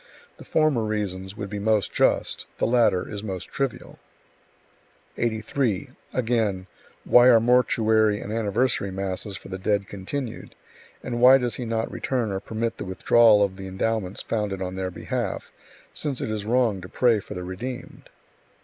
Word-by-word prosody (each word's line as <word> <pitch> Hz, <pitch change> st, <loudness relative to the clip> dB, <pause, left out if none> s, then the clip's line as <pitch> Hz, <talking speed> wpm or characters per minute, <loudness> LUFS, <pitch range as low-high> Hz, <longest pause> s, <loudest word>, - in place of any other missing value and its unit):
The -, -, -11 dB
former 155 Hz, -7 st, +2 dB
reasons 100 Hz, -2 st, -3 dB
would 100 Hz, -3 st, -6 dB
be 105 Hz, -, -3 dB
most 105 Hz, 0 st, +1 dB
just; -, -, +1 dB
the -, -, +1 dB
latter 115 Hz, -7 st, +2 dB
is 105 Hz, -1 st, -6 dB
most 95 Hz, -4 st, -5 dB
trivial." 135 Hz, -3 st, -4 dB, 1.2 s
83. 115 Hz, +1 st, -1 dB, 0.2 s
Again: 110 Hz, -6 st, 0 dB, 0.4 s
"Why 125 Hz, 0 st, +6 dB
are 120 Hz, -3 st, +7 dB
mortuary 110 Hz, -3 st, +3 dB
and 105 Hz, -, -6 dB
anniversary 110 Hz, -1 st, 0 dB
masses 95 Hz, +1 st, -4 dB
for -, -, -12 dB
the 95 Hz, 0 st, -5 dB
dead 100 Hz, 0 st, 0 dB
continued, 110 Hz, +5 st, -6 dB, 0.5 s
and 120 Hz, -1 st, -3 dB
why 130 Hz, +2 st, +9 dB
does 125 Hz, -2 st, -2 dB
he 125 Hz, -, -4 dB
not 115 Hz, 0 st, -2 dB
return 120 Hz, -5 st, -2 dB
or 95 Hz, -, -2 dB
permit 115 Hz, +2 st, -3 dB
the -, -, -4 dB
withdrawal 105 Hz, +3 st, +5 dB
of 95 Hz, -1 st, -2 dB
the 95 Hz, 0 st, -7 dB
endowments 95 Hz, 0 st, -2 dB
founded 105 Hz, -4 st, -2 dB
on 90 Hz, -1 st, -4 dB
their 95 Hz, 0 st, -3 dB
behalf, -, -, -4 dB, 0.4 s
since 140 Hz, -4 st, -3 dB
it -, -, -3 dB
is 105 Hz, -1 st, -4 dB
wrong 115 Hz, -5 st, +2 dB
to 90 Hz, -, -10 dB
pray 120 Hz, -4 st, +3 dB
for -, -, -9 dB
the 90 Hz, -, -5 dB
redeemed?" 120 Hz, +8 st, -7 dB
110 Hz, 160 wpm, -25 LUFS, 95-120 Hz, 1.2 s, why